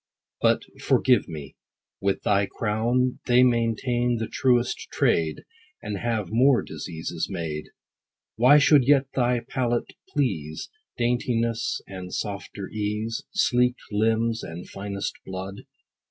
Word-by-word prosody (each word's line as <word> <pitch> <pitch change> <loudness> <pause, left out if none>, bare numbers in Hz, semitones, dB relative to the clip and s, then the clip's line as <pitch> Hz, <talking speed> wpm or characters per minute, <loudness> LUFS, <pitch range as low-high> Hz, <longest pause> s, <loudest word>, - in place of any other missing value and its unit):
But, - - +3 0.2
forgive - - +3
me, 75 -4 -8 0.2
— - - -65
with 100 0 0
thy 100 -1 +2
crown 115 +5 0
They 125 0 +6
maintain 120 0 +1
the 110 - -2
truest 125 -2 +1
trade, 80 -1 +1 0.4
10 - - -27
And 100 - -2
have 110 -5 -1
more 125 +3 +4
diseases 80 +1 -5
made. 75 -3 -4 0.7
What 140 +5 +6
should 140 -2 +5
yet 140 -1 +5
thy 125 -1 +1
palate 120 -2 -1 0.2
please? 80 - -2 0.3
Daintiness, 120 -1 0
and 95 -1 -8
softer 100 -1 -5
ease, 105 +2 -3
Sleeked 125 -8 +2
limbs, 115 +2 +1
and 85 +2 -7
finest 100 0 -4
blood 95 +1 -7
115 Hz, 125 wpm, -25 LUFS, 95-125 Hz, 0.7 s, They